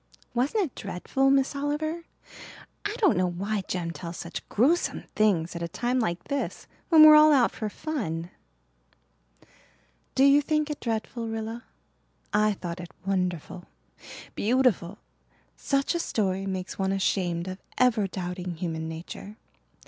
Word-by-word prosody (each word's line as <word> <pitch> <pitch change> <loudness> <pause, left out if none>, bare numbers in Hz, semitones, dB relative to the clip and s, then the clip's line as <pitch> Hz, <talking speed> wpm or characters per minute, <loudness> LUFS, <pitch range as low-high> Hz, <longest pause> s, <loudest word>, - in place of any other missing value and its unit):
"Wasn't 275 - +1
it 280 - -9
dreadful, 235 +8 -1
Miss 275 +1 +2
Oliver? 310 +4 -2 0.8
I 415 +1 -2
don't 400 -9 +4
know 180 0 +2
why 200 +4 -2
Jem 170 -2 -2
tells 170 0 -7
such 170 - -7
gruesome 295 +11 +2
things 180 -6 +2
at 170 - -5
a 170 - -2
time 245 +9 -1
like 175 -7 -1
this 280 -1 -3 0.2
when 320 -3 +8
we're 310 0 +11
all 305 0 +8
out 260 -5 +4
for 215 - -4
fun." 185 - -4 1.8
"Do 265 - +4
you 280 +1 +6
think 305 0 0
it 295 - -5
dreadful, 230 0 -3
Rilla? 225 +1 -5 0.7
I 210 0 +3
thought 175 -2 -6
it 175 -1 -7 0.2
wonderful 180 -2 -2 0.7
beautiful. 215 -5 +1 0.6
Such 275 +2 0
a 340 - -1
story 195 - -1
makes 185 0 -4
one 190 0 +1
ashamed 180 -3 0
of 185 +1 -6 0.2
ever 235 -5 +3
doubting 180 -1 -5
human 160 -2 -4
nature. 175 +6 -8
210 Hz, 140 wpm, -27 LUFS, 180-275 Hz, 1.8 s, we're